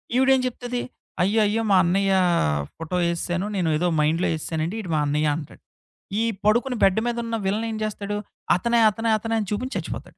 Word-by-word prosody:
ఈవిడ 260 +1 +4
ఏం 260 - +1
చెప్తది? 245 0 -4 0.4
"అయ్యయ్యో! 210 +3 +2
మా - - +6
అన్నయ్య 195 +2 +2 0.6
ఫోటో 165 +2 -5
వేసేశాను. 175 +2 -1
నేనేదో 170 -1 +1
మైండ్‌లో 160 +4 +2
వేసేశానండి. 160 +3 -3
ఈవిడు 185 -6 -5
మా 150 - +2
అన్నయ్య" 150 +1 +1
అంటాడు. 150 - -10 0.6
ఈ - - +2 0.2
పడుకుని 240 +4 +2
బెడ్ 195 +2 +4
మీద 235 0 -1
ఉన్న 230 0 -2
విలన్ 210 +4 0
ఏం - - -4
చేస్తాడు? 205 -1 -3 0.4
అతనే 235 +5 +1
అతనే 225 +2 -2
అతనే 225 +1 -4
అని 210 - -3
చూపించి 250 +6 -3
చచ్చిపోతాడు. - - -7
200 Hz, 170 wpm, -24 LUFS, 170-225 Hz, 0.6 s, మా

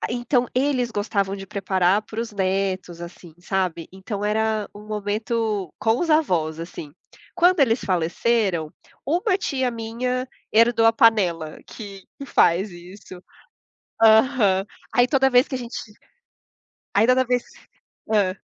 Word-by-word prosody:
A - - -1
Então 245 +1 0
eles 255 -2 +1
gostavam 200 -2 -1
de 195 0 -9
preparar 190 0 +1
para 220 +1 -6
os 230 - -4
netos, 190 -3 -2
assim, 175 -1 -11
sabe, 180 -3 -2
então 200 +2 -5
era 215 0 0
um 210 +1 -12
momento 215 -2 -2
com 225 +2 +1
os 345 - -1
avós, 170 - +1
assim. 165 -3 -8 0.4
Quando 355 -2 +4
eles 235 -2 +3
faleceram, 180 -1 0 0.3
uma 370 - +1
tia 260 -9 -1
minha 250 +3 -3 0.2
herdou 230 0 +4
a 225 - +6
panela 180 -9 +2
que 200 -3 -10
que 280 - -7
faz 180 0 +2
isso 180 +1 -12 0.8
aham. 220 -4 +4 0.3
Aí 245 0 +5
toda 265 0 +3
vez 250 +3 +5
que 265 - -5
a - - -1
gente 240 -1 -7 1.2
aí 210 +3 +5
toda 255 +1 +4
vez 245 0 0 0.7
hã? 195 -3 +1
215 Hz, 140 wpm, -23 LUFS, 190-245 Hz, 1.2 s, a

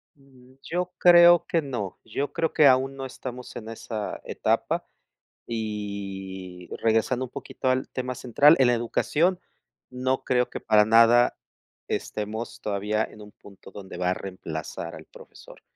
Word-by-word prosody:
Mm, 130 -2 -21
yo 180 +1 -3
creo 175 -1 +7
que 165 - +1
no. 120 -9 -5
Yo 135 +6 -4
creo 165 -1 -1
que 150 - +6
aún 135 +1 +3
no 135 0 -6
estamos 125 -1 -8
en 110 -1 -7
esa 110 -2 -5
etapa. - - -1 0.6
Y 100 -4 -6
regresando 115 +3 +1
un 125 - -9
poquito 130 - -5
al 130 +1 +1
tema 125 0 -4
central, 140 +6 +5
en 130 -2 +5
la 120 - +4
educación, 160 +9 0 0.5
no 130 +1 -1
creo 125 -1 +1
que - - -7
para 105 -2 +4
nada 115 +2 +5 0.5
estemos 110 +2 -4
todavía 105 +1 -1
en 105 - -12
un 105 0 -12
punto 100 -1 -15
donde 95 -3 -9
va 90 0 +1
a - - +1
reemplazar 85 -5 -6
al - - -10
profesor, - - -15
120 Hz, 150 wpm, -25 LUFS, 105-130 Hz, 0.6 s, creo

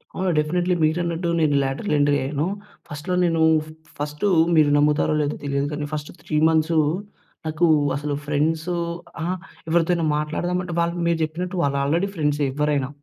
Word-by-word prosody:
అవును. 185 0 0
డెఫినెట్‌‌లీ. 175 +4 +1
మీరు 155 +2 +2
అన్నట్టు 170 0 -2
నేను 150 -3 +2
లేటరల్ 135 +7 -2
ఎంట్రీ 145 0 +3
అయ్యాను. 145 +4 -1 0.4
ఫస్ట్‌లో 150 +5 -4
నేను 165 -1 +1 0.2
ఫ - - -13 0.3
ఫస్టు 150 +6 -2 0.3
మీరు 155 -2 +5
నమ్ముతారో 150 +1 +2
లేదో 145 0 -1
తెలియదు 140 0 -1
గాని 150 0 -3
ఫస్ట్ 150 -1 -4
3 155 - -2
మంత్సు, 160 0 +2 0.7
నాకు 160 +2 +1 0.3
అసలు 145 +1 -3
ఫ్రెండ్సు 155 +4 0 0.5
అహ! 165 - -1 0.4
ఎవరితో 170 +1 +2
అయినా 170 -1 0
మాట్లాడదాం 160 +4 -2
అంటే 180 -1 -6
వాళ్ళకు 170 +1 0
మీరు 170 -1 +2
జెప్పినట్టు 175 +4 -3
వాళ్ళు 140 -1 +1
ఆల్రెడీ 165 +7 +1
ఫ్రెండ్సే 150 -2 +1
ఎవ్వరైనా. 145 -2 0
155 Hz, 160 wpm, -23 LUFS, 145-170 Hz, 0.7 s, మీరు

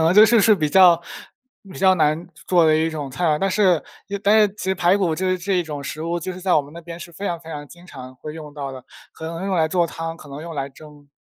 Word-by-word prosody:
可 - - +3
能 165 +2 +4
就 210 +2 +9
是 225 0 +4
是 215 +1 +6
比 155 -6 0
较 175 0 +6 0.7
比 - - -10
较 190 0 +5
难 155 0 +1
做 - - -17 0.2
做 - - +4
的 155 0 +4
一 160 +1 +1
种 145 -3 -5
菜 160 +8 -3
啊， 150 -2 +2
但 195 +3 0
是 185 -5 +3 0.3
也 200 0 -3
但 205 +2 +4
是 210 - +5
其 - - -7
实 190 0 0
排 180 +1 +3
骨 180 -5 0
就 185 +3 -1
是 185 - 0
这 195 +2 -1
一 180 - +2
种 150 -3 -6
食 155 +3 -6
物， 170 +1 -2
就 185 +3 -4
是 185 - -9
在 185 0 +2
我 - - +5
们 140 - -14
那 170 - -9
边 170 0 -9
是 170 - -9
非 195 +5 -6
常 170 -3 -2
非 160 - -14
常 145 -2 -7
经 175 +4 -16
常 130 -5 -10
会 150 +3 -8
用 150 -2 -9
到 140 -2 -5
的， 130 -2 -10 0.3
可 160 - -10
能 165 +1 -5
会 195 - -4
用 195 - -1
来 160 - +3
做 175 0 +1
汤， 165 0 -6
可 155 - -14
能 140 +2 -8
用 165 0 -7
来 140 -2 -3
蒸。 145 +1 -16
165 Hz, 335 characters per minute, -21 LUFS, 150-185 Hz, 0.7 s, 就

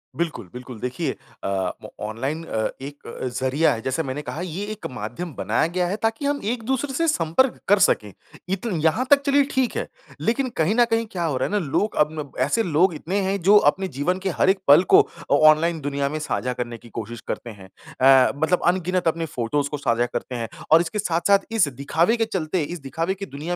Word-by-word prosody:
बिल्कुल, 160 - -3
बिल्कुल, 125 -2 -9
देखिए 125 +1 -3 0.3
अ, 95 -2 -1
म - - -7 0.2
ऑनलाइन 135 +9 -3
अ, 110 -9 -1
एक 140 +1 -9
अ, 125 - -5
ज़रिया 130 +5 +1
है, 115 - -5
जैसे 130 +7 -1
मैंने 135 +1 -4
कहा, 150 +3 -6
ये 185 +3 -4
एक 215 - -8
माध्यम 125 +8 -6
बनाया - - 0
गया 175 +1 -1
है, 190 - -1
ताकि 225 +5 -2
हम 285 0 0
एक-दूसरे 260 +4 -2
से 330 +5 +1
संपर्क 260 - +2
कर 205 +1 +5
सकें। 105 - +2 0.4
इत 195 +3 -2
यहाँ 165 +9 +1
तक, 285 -1 +6
चलिए, 280 0 +4
ठीक 260 -2 0
है। - - -2 0.3
लेकिन 255 +3 0
कहीं 165 +7 +2
न 240 0 +5
कहीं, 225 0 +2
क्या 175 -2 -3
हो 145 -5 0
रहा 130 - 0
है - - -8
ना, 210 - +1
लोग 205 +10 0
अब 150 - +4
न 145 -2 -5
ऐसे 225 - +1
लोग 175 +1 +2
इतने 180 +6 -2
हैं, 195 +1 -1
जो 200 +4 +6
अपने 190 0 -5
जीवन 180 +6 0
के 190 0 -2
हर 185 - +2
एक 190 0 +3
पल 145 +5 +8
को - - +10
अ, - - -5
ऑनलाइन 155 +3 +4
दुनिया 140 0 -1
में 155 +2 -3
साझा 125 -4 -2
करने 120 -1 -5
की 120 - -16
कोशिश 115 +1 -7
करते 120 - -4
हैं। 100 -4 -12 0.6
अ, - - -1
मतलब 160 +5 +1
अनगिनत 180 0 +1
अपने 165 0 0
फ़ोटोज़ 140 0 -2
को 150 - -3
साझा 120 -4 +1
करते 125 +1 -5
हैं 115 -1 -3 0.2
और 160 +1 +8
इसके 175 +5 -3
साथ-साथ, 195 +1 +3
इस 225 -8 +3
दिखावे 145 - +1
के 225 - +1
चलते, 185 -5 -2
इस 175 +4 -5
दिखावे 165 +6 -2
की 195 +1 -6
दुनिया 160 +1 -5
165 Hz, 220 wpm, -23 LUFS, 135-195 Hz, 0.6 s, को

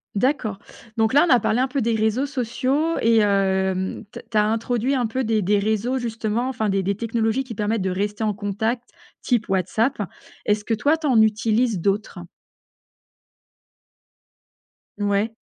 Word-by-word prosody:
D'accord. 235 -2 0 0.4
Donc 220 +1 +2
là, 290 +4 +6
on - - -2
a 245 - +5
parlé 220 +2 0
un 260 - +2
peu 275 0 -2
des 230 0 +1
réseaux 220 +5 +1
sociaux 280 +4 -1
et, 230 0 +4
hem, 190 -2 +1
t - - -9
tu 215 - 0
as 210 - +4
introduit 230 +4 0
un 250 -3 +1
peu 255 +4 -2
des 220 -1 +1
des 205 +2 +2
réseaux, 220 +5 0
justement, 230 +1 -2
enfin, 220 -4 -1
des 195 0 +1
des 200 +2 0
technologies 230 +3 -1
qui 245 -3 -8
permettent 210 0 -1
de 190 - -1
rester 205 +3 -2
en 215 - +1
contact, 220 +4 -3 0.3
type 235 -3 0
WhatsApp. 195 +8 0 0.5
Est-ce 210 0 +1
que, 230 - 0
toi, 290 +9 +2
tu 315 - -7
en 240 -5 +5
utilises 220 0 +2
d'autres? 200 -1 -1 2.8
Mouais. 205 +2 0
220 Hz, 165 wpm, -22 LUFS, 205-245 Hz, 2.8 s, là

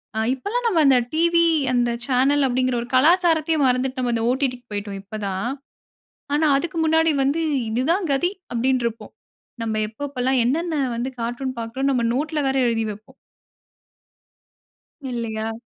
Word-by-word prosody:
அ - - -1
இப்பல்லாம் 425 - -3
நம்ம 360 -7 +2
அந்த 270 -2 +6 0.2
டிவி 335 +1 +3 0.3
அந்த 240 -1 +2 0.2
சேனல் 275 +2 +2
அப்டின்கற 255 0 0
ஒரு 240 - -7
கலாச்சாரத்தையே 325 +1 +3
மறந்துட்டு 255 +1 0
நம்ம 245 -2 0
அந்த 225 - -1
ஓ. - - +4
டி. 275 - +4
டி 250 - -8
க்கு 245 - -27
போய்ட்டோம் 205 -1 -4
இப்ப 205 +2 -8
தான். 195 +5 -2 0.9
ஆனா 305 +1 +2
அதுக்கு 330 +3 -3
முன்னாடி 320 0 +3
வந்து 285 +5 +1 0.3
இது 235 +3 0
தான் 370 -2 -1
கதி 315 +7 +1 0.2
அப்டினு 255 +2 +1
இருப்போம். 230 -1 -6 0.5
நம்ம 220 -1 -2
எப்ப 220 - -20
எப்பலாம் 260 -1 +1
என்னென்ன 320 +7 0 0.2
வந்து 240 +2 -2
கார்ட்டூன் 250 +2 -3
பார்க்கிறோம் 260 +5 -2
நம்ம 245 - +1
நோட்ல 300 +3 -1
வேற 270 - 0
எழுதி 225 -1 0
வைப்போம். 210 +1 -11 2.0
இல்லையா? 225 -2 -3
260 Hz, 160 wpm, -22 LUFS, 235-310 Hz, 2.0 s, அந்த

